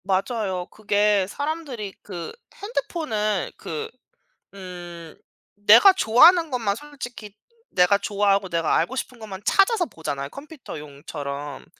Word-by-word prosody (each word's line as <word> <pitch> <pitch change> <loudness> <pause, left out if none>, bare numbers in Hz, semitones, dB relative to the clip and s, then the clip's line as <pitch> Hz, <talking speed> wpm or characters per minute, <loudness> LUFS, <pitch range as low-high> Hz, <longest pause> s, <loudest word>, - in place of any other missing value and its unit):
맞아요. 190 -1 -1
그게 205 -2 +1
사람들이 285 -8 -4
그 175 -4 -7 0.2
핸드폰을 225 - -2
그 155 -2 -5 0.6
음 175 -3 -9 0.4
내가 210 - +8
좋아하는 330 +2 +5
것만 220 -5 -1
솔직히 245 -8 -9 0.3
내가 180 +2 +4
좋아하고 200 -1 +1
내가 170 -2 +1
알고 170 +11 0
싶은 255 -2 -5
것만 200 -3 -8
찾아서 390 -1 +3
보잖아요 140 - -5
컴퓨터용처럼. 145 - -8
205 Hz, 275 characters per minute, -24 LUFS, 180-255 Hz, 0.6 s, 내가